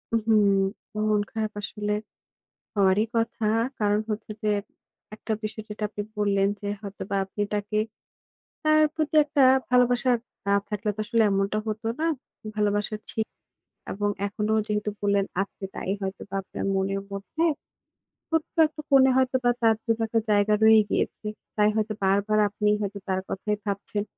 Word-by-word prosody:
উহু, 225 0 +1 0.8
মন 210 -1 +3
খারাপ 220 -1 -2
আসলে 210 0 -2 0.8
হওয়ারই 200 +1 +4
কথা। 230 0 0 0.3
কারণ 205 -1 +2
হচ্ছে 215 0 -4
যে, 215 - +2 0.7
একটা 220 +1 -3
বিষয় 215 0 -4
যেটা 210 0 -5
আপনি 210 - -5 0.2
বললেন 200 -1 +2
যে, 205 - -4
হয়তোবা 200 -1 -5
আপনি 195 +2 -5
তাকে 210 +1 -1 0.9
তার 310 -1 +5
প্রতি 315 -1 -2
একটা 290 -1 +2 0.3
ভালোবাসা 250 0 +4 0.4
না 200 - +3
থাকলে 210 +1 -1
তো - - -4
আসলে 230 +1 +2
এমনটা 195 +2 +1
হত 215 0 -3 0.2
না। 325 - +1 0.5
ভালোবাসা 210 0 +1 0.2
ছিক 220 -1 -1 0.7
এবং 205 +1 -1 0.2
এখনো 210 +1 -2
যেহেতু 210 0 -1
বললেন 200 -1 +2 0.2
আজকে 200 0 -8
তাই - - -4
হয়তোবা 195 0 -5
আপনার - - -6
মনের 195 +1 0
মধ্যে 200 +11 -4 0.9
ছোট্ট 320 -1 -1
একটা 305 0 -9
কোণে 265 -1 +7
হয়তো 260 0 +3
বা 245 - +5
তার 225 -1 +5
জন্য 230 -1 0
একটা 225 +1 +2
জায়গা 205 0 +4
রয়েই 220 0 +8
গিয়েছে। - - -1 0.3
তাই 210 0 +4
হয়তো 215 0 0
বারবার 200 +2 +2
আপনি 210 +1 -1
হয়তো 200 0 -3
তার 190 0 +1
কথাই 210 +2 -2
ভাবছেন। 205 0 -2
210 Hz, 150 wpm, -26 LUFS, 200-225 Hz, 0.9 s, রয়েই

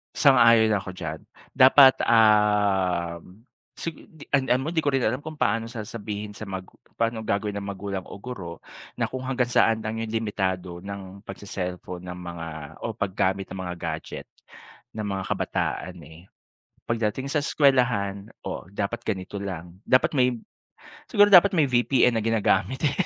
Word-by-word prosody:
Sang-ayon 115 -5 +6
ako 95 - -6
diyan. 80 -3 -5 0.3
Dapat, 130 0 +7
ah, 105 -6 +3 0.6
sig 165 - -4 0.2
di 155 -2 -14
ano 130 -1 +2
mo - - -1
di 160 - +2
ko 145 - +1
rin 135 -2 +1
alam 125 +5 0
kung 155 0 -8
paano 115 -2 0
sasabihin 105 -2 -6
sa 105 0 -8
magu 95 -1 -7 0.2
paano 115 -1 0
ang 110 - -9
gagawin 105 +1 0
ng 100 - -6
magulang 100 -1 -4
o - - -8
guro 100 -7 -7 0.4
na - - +1
kung 130 - -5
hanggang 130 -1 0
saan 115 -2 +2
lang 110 +1 -3
yung 115 - -4
limitado 95 -5 -2
ng 100 0 -8
pagse-cellphone 90 -3 -6
ng 90 0 -7
mga 85 -2 -7 0.3
o - - -3
paggamit 95 -2 0
ng 95 - -7
mga 90 -1 -5
gadget - - -5 0.7
ng 110 - -3
mga 95 -1 -3
kabataan, 90 -1 -3
eh. 80 +1 -14 0.7
Pagdating 115 +3 -1
sa 155 - +1
eskuwelahan, 120 -9 +1 0.2
"Oh - - -5
dapat 105 +4 -3
ganito 100 -1 -3
lang, 90 -3 -7
dapat 130 - +3
may" 125 -1 +3 0.7
siguro 205 0 +6
dapat 195 +1 +8
may 160 - +4
VPN 125 0 +3
na 110 - -1
ginagamit, 115 +2 +1
eh. 145 - +3
105 Hz, 160 wpm, -25 LUFS, 95-125 Hz, 0.7 s, dapat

